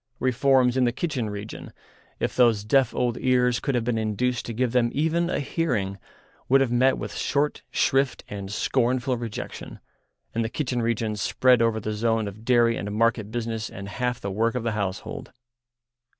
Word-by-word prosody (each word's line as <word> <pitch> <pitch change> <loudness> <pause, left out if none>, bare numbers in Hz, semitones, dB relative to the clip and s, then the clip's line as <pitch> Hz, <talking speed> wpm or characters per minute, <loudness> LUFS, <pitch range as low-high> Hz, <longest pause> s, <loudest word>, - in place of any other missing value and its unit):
Reforms 130 0 +3
in 130 - +4
the 120 - +2
kitchen 130 -5 -2
region, 105 +1 -7 0.5
if - - -2
those 115 -5 +4
deaf 125 +3 +3
old 120 -2 0
ears 125 -1 +2
could 140 - -1
have 120 - +1
been 115 -1 0
induced 110 +3 -1
to 115 - -4
give 125 +1 0
them 120 -1 +2
even 165 +4 +1
a - - 0
hearing, 120 - -1 0.5
would 135 +2 +6
have 135 -3 +1
met 130 +2 +3
with - - -5
short 145 +1 0
shrift 135 0 +1
and 100 -1 -6
scornful 125 +3 +1
rejection, 115 -2 -6 0.5
and 115 - 0
the 115 - -2
kitchen 125 -2 -2
region 115 -2 -1
spread 125 +4 +3
over 115 -1 +2
the 110 0 -3
zone 110 0 0
of 100 +2 -9
dairy 120 -1 +3
and 105 - -4
market 110 -1 +1
business 115 -1 -3
and 100 0 -8
half 125 +2 -2
the 100 - -4
work 115 +4 0
of 125 - -2
the 115 - 0
household. 100 -3 -4
120 Hz, 180 wpm, -25 LUFS, 110-130 Hz, 0.5 s, would